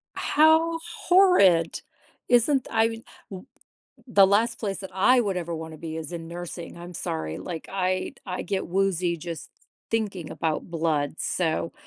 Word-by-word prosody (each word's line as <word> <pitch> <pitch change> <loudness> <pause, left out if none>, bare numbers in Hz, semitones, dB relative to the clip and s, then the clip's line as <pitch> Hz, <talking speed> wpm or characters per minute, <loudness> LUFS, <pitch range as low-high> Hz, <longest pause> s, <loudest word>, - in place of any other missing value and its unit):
How 320 +2 +3 0.3
horrid. 275 - +5 0.5
Isn't 250 +2 +4
th - - -10
I 225 0 +4 0.5
w 185 -2 -9 0.6
the 200 -5 +6
last 230 +4 +2
place 200 -3 -3
that 190 - -7
I 245 +7 +4
would 195 -4 -1
ever 170 -1 -4
wanna 160 -1 -7
be 160 0 -6
is 160 -1 -6
in 165 -1 -6
nursing, 170 0 -7
I'm 175 +1 -9
sorry, 80 - -4
like, 170 -3 -6
I'd 185 -1 -2
I 180 -2 -4
get 195 -4 -2
woozy 180 -2 0
just 165 0 -7 0.4
thinking 200 -8 -2
about 160 0 -2
blood, 155 -3 0
so, 165 -1 -1
180 Hz, 150 wpm, -25 LUFS, 165-215 Hz, 0.6 s, the